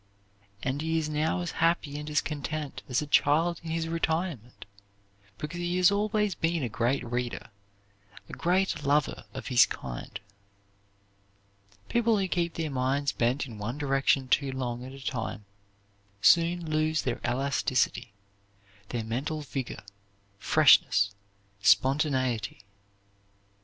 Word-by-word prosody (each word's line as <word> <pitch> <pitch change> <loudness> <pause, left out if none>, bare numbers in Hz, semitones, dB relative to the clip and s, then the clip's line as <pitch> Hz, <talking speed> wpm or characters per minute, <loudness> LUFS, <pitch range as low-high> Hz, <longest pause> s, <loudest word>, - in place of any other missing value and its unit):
And 135 +2 -1
he 160 +1 0
is 155 -1 -1
now 155 +4 0
as 175 - -3
happy 165 -3 +1
and 150 0 -6
as 150 - +2
contented 150 -1 -4
as 125 +4 +1
a - - -5
child 160 +4 +2
in 165 - -6
his 165 0 -1
retirement, 160 - -2 0.7
because 155 +7 -5
he 175 +1 -1
has 185 +1 +5
always 210 0 +1
been 165 -2 -1
a 120 - -1
great 120 +4 0
reader, 120 -1 -4 0.8
a - - -12
great 185 -2 0
lover 145 0 +1
of - - -6
his 120 -5 +6
kind. 60 -2 -7 1.7
People 235 -2 +2
who 195 -1 0
keep 170 -2 -1
their 160 -3 -2
minds 135 +2 0
bent 125 +5 0
in 115 -5 -10
one 120 +6 -4
direction 135 -2 +1
too 135 +1 +2
long 125 -2 -4
at 130 - -8
a 135 -1 -11
time 110 -4 -4 0.7
soon 170 - +4
lose 155 0 +1
their - - -2
elasticity, 130 -2 0 0.8
their 120 -2 -3
mental 135 +8 -3
vigor, 130 -7 -5 0.6
freshness, 100 0 +5 0.5
spontaneity. 130 0 +2
145 Hz, 130 wpm, -28 LUFS, 125-165 Hz, 1.7 s, his